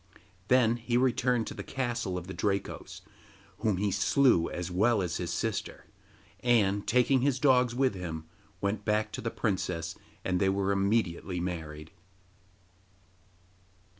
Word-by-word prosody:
Then 120 -2 +4
he 120 +1 0
returned 125 -2 +2
to - - -6
the - - -6
castle 120 -8 -2
of 90 - -6
the 95 - -7
Drakos, 100 +3 -3 0.6
whom 105 -4 +1
he 100 +1 0
slew 105 - +3
as 90 0 -4
well 110 +5 +3
as 90 -4 -1
his 85 -2 -3
sister; - - -3 0.5
and, 105 -5 +2
taking 125 +2 +3
his 135 -1 +2
dogs 125 -3 +3
with 130 -2 +2
him, 85 -4 -5 0.4
went 100 +1 -1
back 105 0 0
to - - -5
the 115 - -2
princess 90 -7 -2 0.3
and 90 -1 +1
they 95 - +3
were 100 0 +1
immediately 100 -3 0
married. 80 -3 -5
100 Hz, 140 wpm, -29 LUFS, 90-120 Hz, 0.6 s, Then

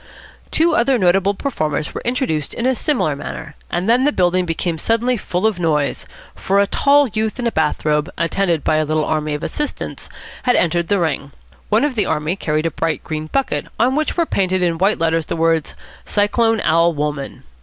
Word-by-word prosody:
Two 330 +1 +3
other 265 -2 +3
notable 195 0 +2
performers 155 - -2
were - - -5
introduced 240 - -1
in 235 - -2
a 260 - +3
similar 245 - 0
manner, 150 +1 -7 0.2
and 175 +3 -2
then 240 +3 +4
the 295 - +3
building 180 -4 +1
became 165 0 -2
suddenly 235 +5 +1
full 185 -2 -2
of 215 -5 +1
noise, 150 -4 0 0.3
for 195 +1 0
a 200 - +4
tall 285 +7 +3
youth 220 +2 -2
in 245 - -3
a 235 - +1
bath 155 -4 -1
robe, 150 0 +1
attended 170 -1 0
by 155 - +2
a 155 - +2
little 155 0 0
army 155 -1 -1
of 150 - -6
assistants, 295 -1 -4 0.3
had 245 - +2
entered 170 0 +1
the 200 - +2
ring. 145 -5 -2 0.4
One 215 +4 +3
of 295 -2 +1
the 210 -5 0
army 150 +4 -1
carried 155 -4 -1
a 165 - 0
bright 165 -1 -2
green 155 -1 -4
bucket, 270 - -1
on 255 +3 +3
which 310 +3 -1
were 340 - +3
painted 185 - 0
in 170 -2 0
white 195 +3 +3
letters 165 -1 0
the - - -2
words 165 -1 +1 0.3
"Cyclone 225 +2 +1
Al. 165 +2 +3
Wolmann." 145 -1 -4
180 Hz, 200 wpm, -19 LUFS, 155-230 Hz, 0.4 s, then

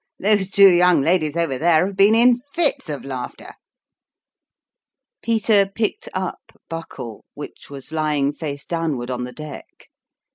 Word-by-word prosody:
Those 200 -1 +2
two 195 -1 +7
young 175 -3 +4
ladies 155 0 +1
over 145 -6 -1
there 165 +1 +3
have 195 0 -5
been 200 +3 +5
in 240 +1 +5
fits 310 - +1
of 145 -2 -5
laughter! 130 -3 -7 0.9
" - - -68
Peter 220 -3 +2
picked 210 +2 -3
up 185 -1 -6
Buckle, 165 -9 -8
which - - -10
was 140 -2 -9
lying 150 -3 0
face 145 -2 -6
downward 155 -8 -3
on 125 0 -3
the 125 - -8
deck. 150 +1 -11
165 Hz, 145 wpm, -21 LUFS, 145-195 Hz, 0.9 s, two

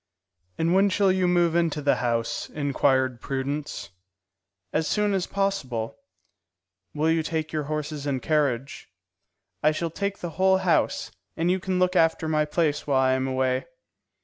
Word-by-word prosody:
"And 165 +2 +1
when 195 +2 +4
shall 195 0 +3
you 185 -1 +1
move 175 -2 +2
into 165 -3 +1
the 145 -1 +2
house?" 115 -2 -1
inquired 130 -3 +1
Prudence. 140 - -4 0.8
"As 155 0 +1
soon 210 -1 +1
as 190 -2 0
possible." 140 - -2 1.0
"Will 155 +2 +2
you 165 0 +2
take 160 -1 -3
your 155 -2 -1
horses 150 -1 -4
and 135 -2 0
carriage?" 140 -4 -1 0.7
"I 150 - +4
shall 165 +1 -3
take 200 +3 -3
the 175 - -5
whole 190 0 +5
house, - - +1 0.3
and 170 +2 +1
you 190 - +1
can 185 0 -2
look 180 0 +2
after 165 -1 +3
my 155 -1 +2
place 150 -1 0
while 135 -2 +3
I 130 0 +3
am 130 0 0
away." 130 0 0
155 Hz, 160 wpm, -25 LUFS, 135-175 Hz, 1.0 s, whole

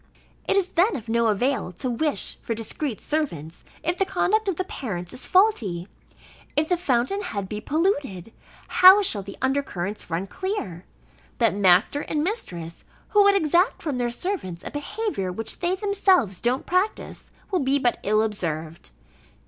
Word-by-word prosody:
It - - +2
is 380 -2 +1
then 360 +3 +2
of 235 -5 -7
no 235 0 +2
avail 230 0 0
to 180 - -3
wish 295 +5 -1
for 230 - -3
discreet 230 +2 -2
servants, 170 - -3 0.2
if 345 +3 -1
the - - +4
conduct 390 +3 +1
of 385 - 0
the 370 - -1
parents 180 - -6
is - - -6
faulty. 225 - +2 0.7
If 305 +1 +1
the 360 - +3
fountain 330 +3 0
head 200 - -4
be 210 +2 -5
polluted, 285 - -1 0.3
how 380 +3 +8
shall 210 - +2
the 200 +1 -10
under 270 +2 +2
currents 200 -6 -6
run 170 +3 -2
clear? 195 - -5 0.5
That 230 -2 +3
master 195 +8 +3
and 300 0 -2
mistress, 175 - -4 0.3
who 415 - +5
would 400 0 +5
exact 350 +3 +2
from 290 -6 -2
their 240 -1 0
servants 235 - -4
a - - -5
behaviour 290 - -3
which 225 +4 -5
they 355 +1 0
themselves 380 - +2
don't 245 +2 0
practice, 370 +4 -2 0.2
will 370 - +2
be 275 0 +2
but 245 -3 +1
ill 215 +2 +2
observed. 165 - -4
265 Hz, 165 wpm, -24 LUFS, -, 0.7 s, how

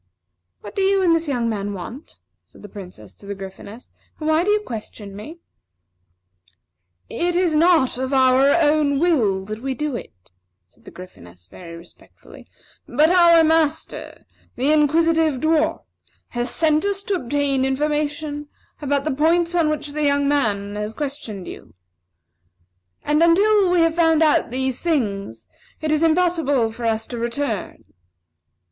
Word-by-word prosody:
"What - - -10
do 395 - -1
you 390 0 +2
and 340 -2 +4
this 330 -1 0
young 245 -5 -1
man 205 -2 -3
want?" 230 - -9 0.2
said - - -20
the 205 - -10
Princess 180 - -11
to 200 - -15
the 200 - -5
Gryphoness, 195 +4 -11 0.3
"and 310 - -4
why 315 +2 +3
do 400 - -1
you 420 0 +3
question 215 - -8
me?" 260 +12 -9 1.7
"It 350 0 -2
is 355 -2 +1
not 310 -6 +3
of 260 +1 -3
our 265 0 +4
own 295 -2 +2
will 235 - +1
that 215 +2 -7
we 265 0 -3
do 300 -1 -3
it," 90 - -11 0.3
said 90 - -28
the - - -11
Gryphoness, 90 - -14
very 170 -2 -11
respectfully; 170 +1 -17 0.4
"but 310 +3 +3
our 340 -2 +6
master, 315 -1 -1 0.3
the 265 +4 +1
Inquisitive 315 0 +2
Dwarf, 315 +1 +1 0.5
has 240 0 -3
sent 310 +2 +1
us 400 0 -2
to 405 - -2
obtain 280 -3 -1
information 295 +2 -2 0.3
about 285 -1 0
the 310 - -1
points 335 +4 +1
on 335 -3 +2
which 300 -1 -3
the 305 +1 -4
young 285 -1 +2
man 205 -8 0 0.2
questioned 265 -8 -6
you; 80 - -11 1.3
and 300 +2 +1
until 390 +4 +4
we 355 -1 +3
have 330 -1 +2
found 325 -1 +4
out 310 - +2
these 260 +1 -3
things, 200 - -2 0.3
it 310 -1 -2
is 305 0 +1
impossible 320 -8 +1
for 235 +1 -7
us 225 -1 0
to 240 - -7
return." 235 -2 -4
290 Hz, 155 wpm, -21 LUFS, 230-325 Hz, 1.7 s, our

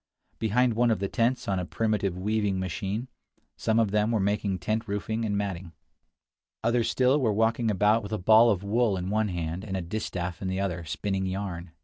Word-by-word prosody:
Behind 115 +3 +2
one 120 +2 +2
of 110 - +2
the 100 - -2
tents, 120 +5 0
on 95 -2 0
a - - -2
primitive 105 -2 -1
weaving 105 0 0
machine, 95 +6 -3 0.5
some 110 0 0
of 110 -3 +2
them 105 +1 +2
were 115 -2 +1
making 100 -1 0
tent 110 +4 -2
roofing 110 +2 -2
and 100 -2 0
matting. 95 -4 -4 0.9
Others 115 0 +2
still 130 +3 +3
were 115 -4 +2
walking 115 +2 +1
about 105 +3 +3
with 100 -1 -8
a 110 - 0
ball 110 +5 +6
of 100 -3 0
wool 105 0 +1
in 90 +1 -3
one 110 0 +1
hand 85 -1 -3
and 95 -3 -3
a - - -2
distaff 90 -2 -4
in 95 - -3
the 95 +1 -2
other, 90 -3 -2
spinning 95 +5 -2
yarn. 95 -3 -4
105 Hz, 205 wpm, -27 LUFS, 95-110 Hz, 0.9 s, ball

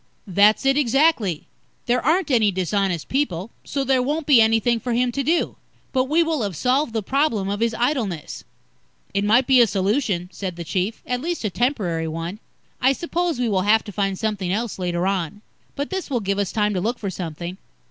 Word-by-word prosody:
"That's 205 +5 +4
it, 270 +1 +3
exactly. 260 - +2 0.4
There 245 +1 +1
aren't 325 +3 +2
any 225 -5 +4
dishonest 190 -2 -1
people, 230 - -1
so 280 -1 -2
there 265 -1 +2
won't 295 +4 -1
be 275 -6 +6
anything 225 +1 +3
for 240 +2 -3
him 245 +1 +1
to 275 - -2
do. 325 +5 0 0.4
But 260 -1 +2
we 315 +5 +3
will 320 -4 -1
have 200 -5 -2
solved 255 - +1
the 220 -2 -1
problem 230 -6 0
of 205 +1 -2
his 230 0 0
idleness." 235 - -2 0.7
"It 200 0 +1
might 230 +5 +4
be 260 -1 +6
a 235 - +5
solution," 195 -1 0
said 185 -1 -5
the 170 - -6
Chief. 190 +6 -2
"At 250 0 -2
least, 340 0 -3
a 210 - -1
temporary 185 - -1
one. 165 +5 -5 0.4
I 260 +2 +4
suppose 340 +1 -2
we 245 -1 0
will 195 -4 +1
have 215 +3 +3
to 205 - -8
find 195 -1 -1
something 205 -4 -2
else 220 +1 -2
later 175 -1 -1
on. 195 +1 -2 0.3
But 285 +1 -4
this 380 -4 -3
will 255 -4 0
give 200 -1 -1
us 200 -3 -1
time 210 -1 +1
to 185 - -1
look 235 +5 -1
for 200 -3 -4
something." 175 0 -6
220 Hz, 205 wpm, -22 LUFS, 190-265 Hz, 0.7 s, be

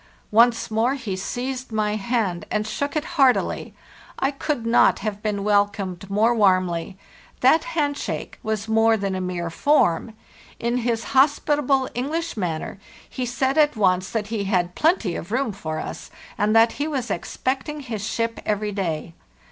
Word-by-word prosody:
"Once 230 +1 +4
more 230 +5 +2
he 230 -8 -4
seized 250 +6 -4
my 215 -1 0
hand 210 -4 -1
and 215 0 -1
shook 285 +7 -3
it 305 0 0
heartily. 275 -8 +1 0.4
I 270 - +1
could 275 -3 -3
not 230 +1 +4
have 210 -1 -3
been 210 -2 -2
welcomed 200 -3 0
more 215 +4 +3
warmly; 185 -4 +1 0.4
that 290 - +5
hand 290 -2 +1
shake - - -5
was 220 -1 -3
more 225 0 +4
than 195 -2 -2
a 185 - -2
mere 175 -2 -3
form. 220 - +2 0.4
In 235 +1 0
his 235 -2 -1
hospitable 275 -1 +3
English 320 +7 -2
manner, 180 -2 -3 0.3
he 255 -2 -4
said 265 +5 0
at 300 -2 +4
once 185 -3 +2
that 215 -2 -3
he 215 -3 -2
had 180 -3 0
'plenty 300 - +1
of 175 - -6
room' 255 -1 0
for 160 -6 -5
us, - - -6 0.3
and 210 +2 +1
that 225 +1 +6
he 295 - +1
was 265 -5 -3
expecting 275 +3 -3
his 225 -6 -5
ship 230 +1 -2
every 210 0 -1
day. 170 -4 -3
225 Hz, 165 wpm, -23 LUFS, 200-260 Hz, 0.4 s, that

